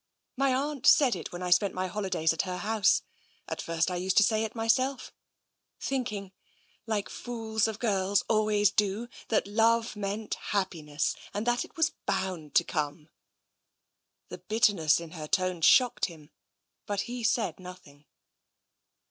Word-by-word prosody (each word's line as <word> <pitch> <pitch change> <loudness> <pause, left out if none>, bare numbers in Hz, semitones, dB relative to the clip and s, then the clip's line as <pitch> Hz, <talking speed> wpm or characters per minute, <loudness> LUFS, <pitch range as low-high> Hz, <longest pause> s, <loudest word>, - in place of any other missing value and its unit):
My 275 0 +2
aunt 280 0 -2
said 275 -7 +6
it, 170 - -7
when 175 +1 -6
I 180 - -2
spent 190 +2 +3
my 185 0 -1
holidays 180 -4 0
at 165 - 0
her 180 -1 -4
house. 210 +2 +2 0.4
At - - -4
first 165 +1 -1
I 180 - -2
used 185 +1 -1
to 210 - +8
say 215 +1 +2
it 220 +1 -5
myself 255 +4 0 0.3
— - - -54
thinking, 215 -8 -3 0.6
like 215 -3 -1
fools 225 -3 -2
of 220 -2 -4
girls 200 -3 +1
always 210 -2 +3
do, 210 +3 0 0.2
that 220 - +1
love 225 +2 +2
meant 210 +1 -3 0.2
happiness 155 -7 -1 0.2
and 205 +2 -2
that 240 0 +1
it - - -15
was 325 0 +2
bound 175 -6 -2
to - - +6
come." 150 0 -4 1.2
The - - -8
bitterness 205 -9 +2
in 170 -1 -9
her 155 -3 -7
tone 185 0 0
shocked 250 +8 +5
him, 160 -4 -11 0.6
but 205 -1 -1
he 240 +3 -5
said 215 -7 0
nothing. 180 -6 -13
205 Hz, 155 wpm, -29 LUFS, 180-225 Hz, 1.2 s, to